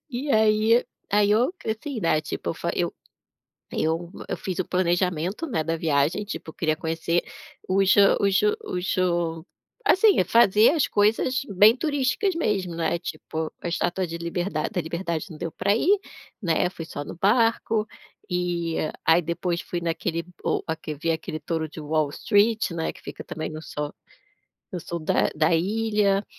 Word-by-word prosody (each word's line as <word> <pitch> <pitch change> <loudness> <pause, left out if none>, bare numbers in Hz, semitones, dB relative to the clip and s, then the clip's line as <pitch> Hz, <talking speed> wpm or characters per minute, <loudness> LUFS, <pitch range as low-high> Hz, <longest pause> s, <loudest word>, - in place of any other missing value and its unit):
E 275 +4 -3
aí 220 +2 +4 0.3
aí, 205 0 +4
eu, 235 +8 +3
assim, 225 +4 -3
né, 165 -4 +2
tipo 150 - -4 0.2
eu - - 0 0.8
eu 165 +2 -1 0.3
fiz 185 -2 -5
o - - 0
planejamento, 180 - 0
né, 160 - 0
da 165 +1 -1
viagem. 155 +4 +1
Tipo 180 -5 -7
queria 155 -1 0
conhecer 165 +1 -1 0.5
os 195 0 +4
hã 200 -1 +6
os 195 -1 +3 0.2
os 180 - -2
o 170 -3 0 0.4
assim, 405 - +5
fazer 215 +1 +5
as 310 -2 +2
coisas 225 +6 +2
bem 210 +4 +6
turísticas 295 +6 0
mesmo, 195 - -1
né? 165 0 0
Tipo 160 -1 -5
a - - -6
estátua 175 +2 -1
de 165 0 -5
liberdade 170 +3 -2
da 190 - -1
liberdade 170 0 -3
não 160 -4 -10
deu 165 - -3
para 200 +5 +1
ir, 390 - +3 0.4
né, 180 -2 +1
fui 170 -3 -7
só 145 -2 -6
no - - -8
barco. 225 0 +2 0.5
E 175 -2 -1 0.3
aí, 165 +2 +5
depois 170 +1 -2
fui 175 - -4
naquele 170 0 -2 0.2
o - - 0 0.4
vi 165 - +1
aquele 160 -1 -3
touro 160 +1 -2
de 155 - -9
Wall 155 -1 0
Street, 215 +6 +2
né, 165 -1 -2
que - - -17
fica - - -8
também 155 - -5
no 155 0 -7
so 150 -1 -5 0.8
no 180 - -3
sul 170 +1 -5
da 155 - +2
da 155 +2 +2
ilha. 205 +2 +1
180 Hz, 160 wpm, -25 LUFS, 165-215 Hz, 0.8 s, hã